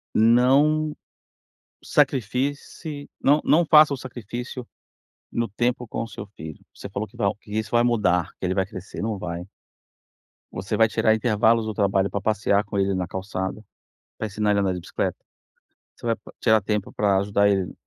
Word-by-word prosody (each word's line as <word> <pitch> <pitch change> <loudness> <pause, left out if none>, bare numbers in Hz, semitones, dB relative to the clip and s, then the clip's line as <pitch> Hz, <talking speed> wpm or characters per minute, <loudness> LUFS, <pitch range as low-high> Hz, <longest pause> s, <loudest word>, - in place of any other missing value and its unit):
não, 140 +7 +4 0.9
sacrifique-se, 140 +4 -1
não 145 +2 +4
não 170 +3 +4
faça 150 -1 +7
o - - -3
sacrifício, 120 0 -7 0.6
no 115 0 -1
tempo 120 +4 -1
com - - -4
o - - -6
seu 100 -2 -8
filho. 80 -1 -9
Você 100 - -9
falou 100 +3 -4
que - - -22
va 100 -5 +1
que 105 - -15
isso 110 - -2
vai 120 0 +4
mudar, 95 -8 +2
que - - -3
ele 90 +1 0
vai 95 - +1
crescer, 95 0 -9
não 110 -1 -2
vai. 85 0 -5 1.1
Você 95 +4 -3
vai 115 0 +5
tirar 110 0 +2
intervalos 110 0 +2
do 110 - -3
trabalho 100 -1 +1
pra 100 - -2
passear 105 0 +1
com 105 0 -4
ele 100 0 +2
na 90 -1 -2
calçada. 95 +2 -4 0.5
Vai 110 - -2
ensinar 105 0 0
ele 100 - +3
a - - +1
andar 95 -1 0
de 90 - -5
bicicleta. - - -3 0.8
Você - - -12
vai 115 - +2
p - - -31 0.2
tirar 110 -3 +4
tempo 105 0 -2
pra 100 -2 +2
ajudar 100 +1 +2
ele, 95 -2 0
105 Hz, 180 wpm, -24 LUFS, 100-120 Hz, 1.1 s, faça